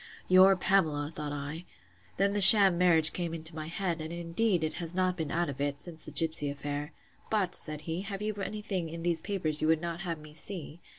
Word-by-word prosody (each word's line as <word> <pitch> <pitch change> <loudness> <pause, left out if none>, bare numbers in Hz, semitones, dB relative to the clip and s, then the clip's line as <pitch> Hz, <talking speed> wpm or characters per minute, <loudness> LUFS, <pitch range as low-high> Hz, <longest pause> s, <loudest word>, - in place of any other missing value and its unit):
Your 185 +1 +5
Pamela! 155 -6 -1
thought 150 -1 -6
I. 145 +3 -7 0.5
Then 200 +1 0
the 205 - -1
sham 195 -1 +10
marriage 170 -3 +3
came 170 -2 -5
into 160 0 -5
my 155 -1 -7
head; 170 -1 -4
and 160 +1 -8
indeed 170 +2 -2
it 155 - -3
has 170 +1 -7
not 185 -1 -1
been 160 -4 -6
out 170 +3 -2
of 140 -1 -7
it, 145 0 -3
since 165 -3 -5
the - - -10
gipsy 160 -3 0
affair.—But, 145 +7 -6
said 155 -1 +5
he, 165 +3 -6
have 195 0 -7
you 215 0 -3
any 210 +1 -6
thing 185 -6 -4
in 165 +1 -9
these 170 -2 -1
papers 160 -7 -3
you 155 - -1
would 160 0 +1
not 170 0 -6
have 170 -3 -5
me 150 0 -15
see? 165 0 -6
165 Hz, 220 wpm, -28 LUFS, 155-185 Hz, 0.5 s, sham